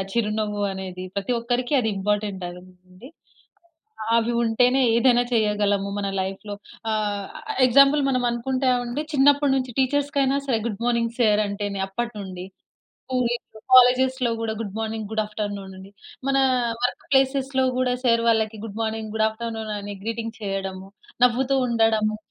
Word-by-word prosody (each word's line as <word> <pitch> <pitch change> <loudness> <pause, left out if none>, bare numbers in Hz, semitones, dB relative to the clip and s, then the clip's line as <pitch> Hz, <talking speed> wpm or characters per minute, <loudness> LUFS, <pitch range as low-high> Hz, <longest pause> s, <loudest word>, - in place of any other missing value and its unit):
చిరునవ్వు 210 -2 -1
అనేది 185 -1 -6
ప్రతి 200 +5 -1
ఒక్కరికి 245 +4 -1
అది 220 - -1
ఇంపార్టెంట్ 205 -1 -1
అండి. 185 +4 -15 1.1
అవి 230 +1 +1
ఉంటేనే 245 +3 +3 0.2
ఏదైనా 245 0 +4
చేయగలము 205 -3 +1
మన 200 - -2
లైఫ్‌లో. 195 +2 -5 0.4
ఆహ్, 205 -2 -1 0.4
ఎగ్జాంపుల్ 275 +3 +5
మనం 255 -1 0
అనుకుంటామండి 250 +2 -1
చిన్నప్పటి 285 0 +4
నుంచి 255 -1 -2
టీచర్స్‌కైనా 275 0 +1
సరే, 245 -5 +1
గుడ్ 215 -1 -4
మార్నింగ్ 235 -1 0
సార్ 215 -2 +4
అంటేనే 200 -1 -4
అప్పటినుండి. 195 -4 -5 0.7
స్కూల్, 250 -2 +1 0.4
కాలేజెస్‌లో 255 0 +5
గూడా 225 -1 -2
good 205 -3 -5
morning, 220 -1 -3
good 220 0 0
after 210 0 -4
noon 195 -1 -9
అని, 190 +1 -12 0.4
మన 275 - +2 0.5
వర్క్ 245 - -1
ప్లేసెస్‌లో 265 0 +2
గూడా 250 -1 +1
సార్ 230 -2 +3
వాళ్ళకి 220 -1 +1
good 220 -1 -7
morning, 220 -1 -3
good 220 0 +2
after 230 +1 -5
noon 220 -1 -4
అని 205 0 -6
గ్రీటింగ్ 230 0 -4
చేయడము 195 -1 -4 0.4
నవ్వుతూ 255 +2 +2
ఉండడము. 220 -2 +2
225 Hz, 135 wpm, -23 LUFS, 205-250 Hz, 1.1 s, ఎగ్జాంపుల్